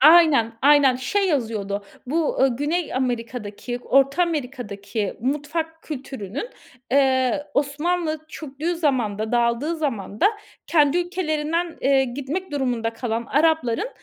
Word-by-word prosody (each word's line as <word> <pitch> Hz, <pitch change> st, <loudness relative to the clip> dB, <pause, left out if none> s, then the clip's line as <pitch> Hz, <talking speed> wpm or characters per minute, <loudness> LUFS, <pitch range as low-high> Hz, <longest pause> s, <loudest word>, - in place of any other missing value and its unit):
Aynen, 300 Hz, -6 st, +6 dB
aynen. 280 Hz, -3 st, +6 dB
Şey 390 Hz, +11 st, 0 dB
yazıyordu. 215 Hz, -, -1 dB, 0.2 s
Bu, 315 Hz, +3 st, 0 dB
ııı, 260 Hz, -3 st, +3 dB
Güney 310 Hz, +4 st, -1 dB
Amerika'daki, 240 Hz, -2 st, -3 dB
Orta 275 Hz, +6 st, +3 dB
Amerika'daki 235 Hz, -, -3 dB
mutfak 300 Hz, +5 st, -2 dB
kültürünün, 270 Hz, -, -6 dB, 0.4 s
eee, 265 Hz, +2 st, +2 dB
Osmanlı 310 Hz, +2 st, 0 dB
çöktüğü 310 Hz, +3 st, -4 dB
zamanda, 235 Hz, -9 st, 0 dB
dağıldığı 240 Hz, +7 st, +1 dB
zamanda 220 Hz, -, 0 dB, 0.4 s
kendi 300 Hz, 0 st, +4 dB
ülkelerinden, 335 Hz, -1 st, -1 dB
eee, 270 Hz, 0 st, +4 dB
gitmek 285 Hz, +9 st, -4 dB
durumunda 245 Hz, -5 st, -1 dB
kalan 230 Hz, -1 st, -3 dB
Arapların, 315 Hz, -, +2 dB
275 Hz, 105 wpm, -23 LUFS, 240-315 Hz, 0.4 s, Aynen